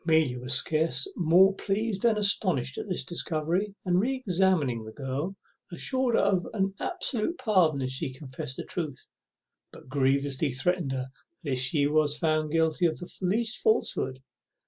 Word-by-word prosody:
Amelia 160 -7 +2
was 125 +1 +1
scarce 155 -3 +2
more 180 +3 +5
pleased 200 +1 -2
than 230 -2 +3
astonished 185 - +1
at - - -6
this 180 - -1
discovery, 170 +4 -1
and 180 -1 +3
re 255 +7 +1
examined 180 - +1
the - - -7
girl, 135 +7 -3 0.4
assuring 255 +7 0
her - - +3
of 195 -3 +1
an 195 -1 0
absolute 335 - -2
pardon 180 - +2
if 130 - -2
she 130 +1 -2
confessed 130 -1 -6
the - - -5
truth, 155 -6 -5 0.6
but - - -14
grievously 140 +1 +1
threatening 175 +3 0
her 130 0 -3 0.3
if 135 -5 -1
she 140 +3 +1
was 150 0 +2
found 155 0 0
guilty 165 +1 +2
of 160 - -3
the 175 - -8
least 220 +5 0
falsehood. 130 - +1
160 Hz, 160 wpm, -28 LUFS, 135-195 Hz, 0.6 s, more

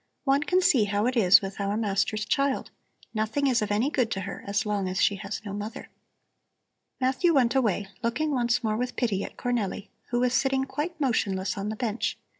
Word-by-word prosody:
One 275 0 +3
can 365 +4 +2
see 285 -12 +4
how 205 +1 0
it 250 +1 0
is 200 -4 +6
with 195 +1 -6
our 200 +1 -1
master's 210 0 0
child; 275 -1 0 0.4
nothing 220 +6 0
is 255 -4 +3
of 210 - -1
any 220 +8 +1
good 250 -6 +1
to 195 - -3
her 195 +1 -6
as 200 +2 0
long 205 -3 -1
as 185 +1 -2
she 200 - +3
has 200 +1 -6
no 200 - -5
mother." 210 +2 -6 1.1
Matthew 265 +6 +2
went 250 -3 +3
away, 215 -7 +1 0.2
looking 295 +7 0
once 245 -2 +1
more 215 -1 0
with 250 +1 -3
pity 205 -6 0
at - - -8
Cornelli, 230 -5 -2 0.2
who 240 - 0
was 250 0 +2
sitting 265 +1 +2
quite 310 +5 -4
motionless 200 -8 0
on 200 +1 -3
the 215 - -3
bench. 225 -1 -2
230 Hz, 205 wpm, -27 LUFS, 205-265 Hz, 1.1 s, is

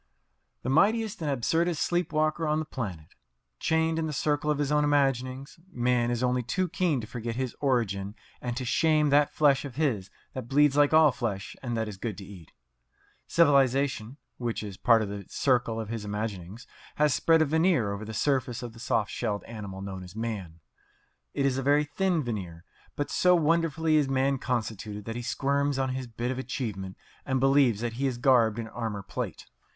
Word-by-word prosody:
The 130 - -2
mightiest 215 +6 +2
and 155 - -1
absurdest 160 +6 0
sleep 175 -1 0
walker 155 +1 +1
on 150 0 +1
the 155 - -2
planet! 95 - -6 0.5
Chained 160 0 +1
in 160 - -1
the - - -3
circle 145 +1 0
of 150 - +2
his 145 -1 -1
own 150 0 +3
imaginings, 135 -1 0
man 120 -2 +1
is 120 0 -1
only 125 0 +1
too 180 +10 -1
keen 170 -6 +1
to - - -6
forget 115 0 -5
his 130 -1 -3
origin 105 -7 0 0.3
and 120 -1 -3
to 130 - -3
shame 155 +2 +2
that 145 0 +4
flesh 145 -3 +3
of 135 -4 -8
his 125 -11 0 0.2
that 130 -3 -6
bleeds 145 +1 +4
like 145 0 +4
all 155 -2 +6
flesh 115 -6 -4
and 120 -3 -3
that 110 -1 -1
is 105 -3 -7
good 105 -2 -4
to 100 - -8
eat. 90 -5 -13 0.8
Civilization 140 -5 +2 0.2
(which 120 -3 -2
is 100 -2 -6
part 115 0 +4
of 100 - -4
the 100 0 -6
circle 120 -4 +1
of 110 -2 -5
his 115 -2 -4
imaginings) 105 0 -5 0.3
has 150 -2 +3
spread 160 +5 +4
a - - +1
veneer 160 - +2
over 100 +1 -6
the 110 - -7
surface 130 0 0
of 120 -2 -7
the 115 - -14
soft 115 -3 0
shelled 105 -4 -2
animal 100 -4 -7
known 95 -1 -6
as 90 +2 -12
man. 100 -8 -5 0.7
It 140 - +1
is 135 -1 +1
a - - -1
very 145 +2 +3
thin 170 +2 0
veneer; 95 -8 -5 0.3
but 145 - -3
so 180 0 +4
wonderfully 160 -1 +2
is 145 -3 +2
man 135 0 +1
constituted 110 -4 -3
that 115 - -5
he 120 - -3
squirms 140 +3 0
on 135 -1 0
his 130 0 -4
bit 120 +2 -3
of 130 - -4
achievement 105 -8 -4 0.3
and 130 0 0
believes 135 -5 +3
he 120 +3 -1
is 125 -2 -2
garbed 120 -4 +4
in 115 -1 -4
armour 110 -3 -4
plate. 100 - -5
130 Hz, 195 wpm, -28 LUFS, 110-145 Hz, 0.8 s, all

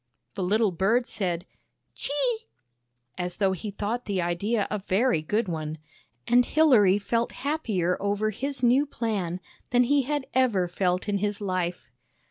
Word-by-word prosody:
The 200 - -5
little 205 +3 +2
bird 210 +8 +2
said 180 -6 -2 0.2
" - - -51
Chee! 455 - -1 0.3
" 120 0 -49
as 180 0 -5
though 195 -2 +2
he 190 +3 -4
thought 210 +4 -3
the 200 -3 -1
idea 195 +5 0
a 210 - -1
very 200 0 +1
good 210 +7 0
one, 155 -2 -4 0.5
and 245 +1 +5
Hilary 240 -10 +5
felt 230 +3 -1
happier 215 - 0
over 205 +2 0
his 270 +4 -3
new 260 +4 +4
plan 200 -9 -2 0.3
than 245 0 +4
he 285 +3 +3
had 285 +1 -2
ever 235 -9 +2
felt 180 +2 -1
in 200 -1 0
his 205 0 -1
life. 185 -3 -3
205 Hz, 160 wpm, -26 LUFS, 180-245 Hz, 0.5 s, and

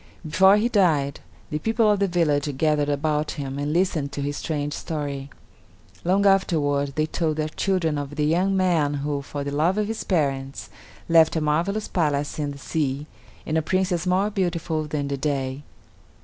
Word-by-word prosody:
Before 190 +6 +5
he 220 +3 +2
died, 160 - +2 0.3
the 150 - -1
people 225 +4 +2
of 205 - +1
the 200 - +2
village 150 -5 0
gathered 150 -1 +2
about 150 +1 0
him 140 -1 -4
and 145 +1 -1
listened 160 -4 0
to 140 - -3
his 145 +1 -2
strange 145 -2 -2
story. 145 -4 -4 0.7
Long 195 +3 +2
afterward 145 -8 +2
they 155 - +1
told 155 0 -1
their 155 0 -1
children 165 -4 0
of 145 0 -6
the 150 0 0
young 185 +5 +2
man 165 -6 +2
who, 145 0 -2
for 140 +1 -5
the 140 - -4
love 160 +7 +1
of 210 - +1
his 220 0 -4
parents, 135 -6 -1 0.4
left 165 -1 +5
a - - +2
marvelous 170 +8 0
palace 150 -4 -1
in 145 -1 -1
the 140 - -7
sea, 140 -1 -2 0.4
and 160 +1 +1
a - - 0
Princess 185 +1 0
more 190 +3 +2
beautiful 170 -5 -1
than 150 -1 -3
the 140 0 -2
day. 135 -1 -2
155 Hz, 180 wpm, -24 LUFS, 145-180 Hz, 0.7 s, Before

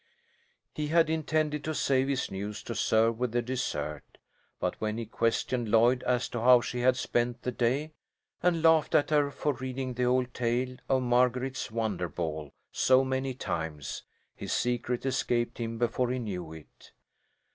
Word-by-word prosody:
He 150 -1 -3
had 160 0 +3
intended 155 -1 0
to 155 0 -3
save 135 -2 +2
his 140 -2 -1
news 100 +2 -5
to 115 - -5
serve 115 0 +2
with 125 -2 -1
the 120 - +2
dessert, 75 - -4 0.4
but - - -2
when 110 0 -1
he 115 - -3
questioned 115 +1 -1
Lloyd 120 +3 +4
as 125 -1 +1
to 120 - -4
how 125 +1 +7
she 125 +1 -4
had 125 +1 +3
spent 120 -1 -1
the 125 - -1
day, 130 +6 0 0.5
and 170 -2 +2
laughed 160 -2 +4
at 145 - +3
her 145 -2 +3
for 140 +1 -1
reading 130 0 -4
the 125 +1 0
old 125 0 +1
tale 125 +1 -1
of 130 -1 +2
Marguerite's 125 +1 +1
wonder 110 -6 -2
ball 75 -2 -4 0.2
so 130 0 +4
many 130 0 -2
times, 80 - -4 0.3
his - - -6
secret 125 +1 -1
escaped 120 -2 0
him 115 -1 -3
before 120 +1 0
he 130 - -1
knew 90 -9 -5
it. 80 -2 -14
125 Hz, 170 wpm, -29 LUFS, 115-130 Hz, 0.5 s, how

